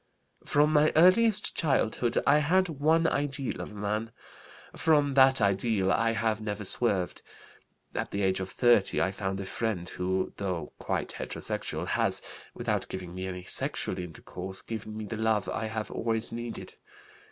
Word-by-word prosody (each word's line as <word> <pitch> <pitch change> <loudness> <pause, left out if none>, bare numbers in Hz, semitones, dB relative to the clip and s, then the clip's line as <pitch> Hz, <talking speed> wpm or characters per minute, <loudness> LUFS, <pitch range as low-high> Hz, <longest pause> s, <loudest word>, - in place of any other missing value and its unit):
"From 150 +1 +3
my 150 0 +5
earliest 205 +6 +5
childhood 125 -5 +1
I 145 +2 +5
had 180 +5 +2
one 160 +2 +2
ideal 140 -4 -1
of - - -6
a 105 - -12
man. 105 +2 -2 0.6
From 145 -3 +3
that 135 0 +6
ideal 100 -1 +2
I 115 0 +2
have 110 -1 0
never 105 -1 -4
swerved. 95 -4 +1 0.7
At - - -3
the 100 0 -2
age 95 0 +2
of 95 0 -4
30 120 -2 +3
I 95 - +1
found 95 -1 -3
a 100 - -4
friend 95 -4 -2
who, 95 +1 -2
though 95 -4 -3
quite - - -2
heterosexual, - - -4
has, - - 0 0.3
without - - -2
giving 90 -2 -6
me 95 +1 -4
any 90 -1 -6
sexual 90 - -1
intercourse, 90 +2 -7
given 110 -1 -6
me 110 - -5
the 110 +2 -5
love 110 -2 +1
I 110 - -2
have 110 0 -4
always 115 0 -2
needed. 120 0 -6
110 Hz, 160 wpm, -29 LUFS, 95-140 Hz, 0.7 s, that